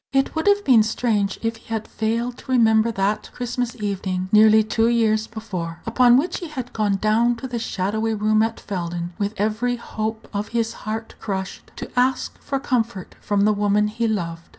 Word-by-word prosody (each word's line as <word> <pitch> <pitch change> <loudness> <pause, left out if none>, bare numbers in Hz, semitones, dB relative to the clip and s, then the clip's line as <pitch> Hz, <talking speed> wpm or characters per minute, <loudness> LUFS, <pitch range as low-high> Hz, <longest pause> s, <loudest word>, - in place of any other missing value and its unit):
It 270 -1 +1
would 320 +4 -2
have 405 0 +4
been 245 -5 +6
strange 215 -2 0
if 225 0 -1
he - - -21
had 220 -1 -2
failed 230 +2 -2
to - - -8
remember 225 -2 +4
that 200 0 -1
Christmas 245 0 -3
evening 190 -3 -3
nearly 215 0 +6
two 225 +1 +1
years 220 -2 +2
before, 185 -7 -6
upon 240 +1 +5
which 335 +6 0
he 345 - -6
had 260 -5 -6
gone 210 -2 +1
down 220 +4 +2
to 260 +3 -6
the 245 -2 -3
shadowy 220 +1 -1
room 215 +1 +2
at 225 0 -1
Felden, 175 -2 -4
with 205 +1 -1
every 220 +4 0
hope 220 -2 -5
of 205 +1 -2
his 230 -1 0 0.2
heart 220 +1 -4
crushed, 190 -3 -5
to - - -7
ask 255 +1 0
for 275 -1 -2
comfort 235 -8 -2
from 205 -1 0
the 210 +1 +4
woman 205 0 +2
he 230 +2 -1
loved. 170 -6 -3
220 Hz, 190 wpm, -22 LUFS, 205-235 Hz, 0.2 s, been